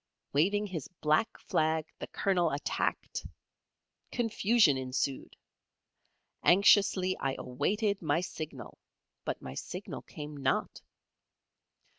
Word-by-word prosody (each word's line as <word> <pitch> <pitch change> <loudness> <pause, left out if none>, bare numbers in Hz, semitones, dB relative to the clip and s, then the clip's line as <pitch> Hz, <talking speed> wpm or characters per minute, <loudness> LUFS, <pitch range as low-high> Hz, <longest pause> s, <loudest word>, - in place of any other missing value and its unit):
Waving 200 +9 +3
his 170 -8 -5
black 155 +9 +2
flag, 160 0 0
the - - -5
Colonel 180 -4 +1
attacked. 145 0 -2 0.9
Confusion 225 - +3
ensued. 130 +1 -2 1.1
Anxiously 190 0 +5
I 135 -1 -1
awaited 200 - 0
my 160 0 +1
signal, 160 -4 -7 0.5
but - - -3
my 65 - -6
signal - - -6
came 150 0 -8
not. 135 -2 -1
165 Hz, 95 wpm, -31 LUFS, 145-200 Hz, 1.1 s, Anxiously